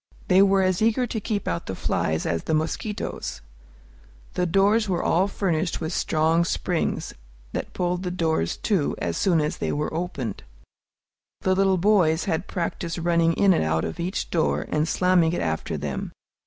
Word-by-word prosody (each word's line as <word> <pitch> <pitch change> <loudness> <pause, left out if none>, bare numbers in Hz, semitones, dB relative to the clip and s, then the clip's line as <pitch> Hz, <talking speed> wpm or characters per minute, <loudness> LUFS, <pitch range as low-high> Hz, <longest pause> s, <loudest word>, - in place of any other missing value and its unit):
They 185 +1 +6
were 195 -1 +4
as 185 0 +1
eager 225 +3 +3
to 230 -1 -3
keep 205 -1 -3
out 170 - -2
the 95 - -3
flies 80 -3 -1
as 85 -1 -1
the 160 - +1
mosquitoes. 160 - -3 0.9
The 180 - 0
doors 200 +4 +3
were 175 -2 0
all 180 +4 +2
furnished 175 -4 -1
with 160 +1 -3
strong 160 +1 +2
springs, 170 - -1 0.4
that - - -4
pulled 180 0 -1
the 185 - -3
doors 160 - 0
to 190 -9 0
as 85 -1 -2
soon 175 -4 +2
as 150 0 -1
they - - -2
were 150 +2 -2
opened. 155 - -4 1.0
The 185 - +2
little 190 0 +3
boys 175 -4 +3
had 175 -2 -1
practised 170 -1 -3
running 170 -1 +2
in 195 +2 +4
and - - +1
out 80 +1 0
of - - -5
each 180 +3 -3
door, 165 -2 +1
and 150 +1 +1
slamming 175 -1 +3
it - - -1
after 80 -1 -2
them. 70 -1 -4
170 Hz, 175 wpm, -24 LUFS, 160-190 Hz, 1.0 s, They